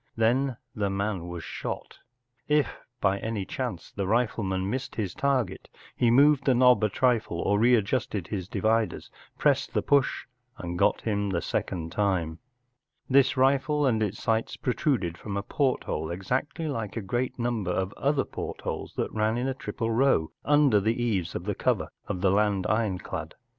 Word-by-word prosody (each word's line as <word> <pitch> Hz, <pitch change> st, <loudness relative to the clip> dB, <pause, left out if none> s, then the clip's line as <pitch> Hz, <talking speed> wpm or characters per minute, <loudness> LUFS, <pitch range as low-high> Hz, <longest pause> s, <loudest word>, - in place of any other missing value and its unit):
Then 120 Hz, +3 st, +2 dB, 0.2 s
the 100 Hz, -2 st, -1 dB
man 95 Hz, -2 st, -2 dB
was 85 Hz, -1 st, -6 dB
shot. -, -, -6 dB, 0.5 s
If 150 Hz, -1 st, +1 dB, 0.2 s
by 100 Hz, 0 st, +2 dB
any 110 Hz, -3 st, -3 dB
chance -, -, -5 dB
the 100 Hz, -2 st, -3 dB
rifleman 100 Hz, -4 st, 0 dB
missed 130 Hz, +5 st, -3 dB
his 100 Hz, -5 st, -2 dB
target 135 Hz, -8 st, -1 dB, 0.3 s
he 120 Hz, -, +3 dB
moved 140 Hz, +3 st, +5 dB
the 130 Hz, -, +4 dB
knob 125 Hz, -3 st, +5 dB
a 105 Hz, -, +3 dB
trifle, 115 Hz, -6 st, +1 dB
or 100 Hz, +3 st, +1 dB
read¬ 120 Hz, -1 st, +5 dB
justed 105 Hz, -4 st, -2 dB
his 95 Hz, -4 st, -3 dB
dividers, 110 Hz, +3 st, 0 dB, 0.3 s
pressed -, -, +1 dB
the -, -, +2 dB
push, 140 Hz, -2 st, +2 dB, 0.3 s
and 90 Hz, -1 st, -5 dB
got -, -, +3 dB
him 100 Hz, -2 st, -1 dB
the 90 Hz, -3 st, 0 dB
second 80 Hz, 0 st, -3 dB
time, 90 Hz, -6 st, 0 dB, 0.7 s
This 135 Hz, -1 st, +4 dB
rifle 140 Hz, +3 st, +3 dB
and 115 Hz, -4 st, +2 dB
its 105 Hz, -1 st, -1 dB
sights 115 Hz, 0 st, 0 dB
protruded 115 Hz, -, 0 dB
from 100 Hz, -2 st, -4 dB
a 100 Hz, -, -2 dB
porthole, 125 Hz, -, -1 dB
exactly 125 Hz, -, -2 dB
like 115 Hz, -7 st, -3 dB
a -, -, -1 dB
great 120 Hz, +6 st, -2 dB
number 120 Hz, -6 st, -1 dB
of 95 Hz, +2 st, -1 dB
other 140 Hz, 0 st, +1 dB
portholes -, -, -5 dB
that -, -, -2 dB
ran 110 Hz, +1 st, +1 dB
in 125 Hz, +2 st, -1 dB
a 135 Hz, -, 0 dB
triple 115 Hz, -3 st, -3 dB
row 115 Hz, -9 st, +2 dB
under 145 Hz, -7 st, +4 dB
the 110 Hz, +4 st, 0 dB
eaves 100 Hz, -8 st, -1 dB
of -, -, -3 dB
the -, -, 0 dB
cover -, -, 0 dB, 0.2 s
of 90 Hz, -, -3 dB
the 95 Hz, -, +3 dB
land 100 Hz, -1 st, +2 dB
ironclad. 95 Hz, -6 st, -2 dB
110 Hz, 170 wpm, -27 LUFS, 95-125 Hz, 0.7 s, moved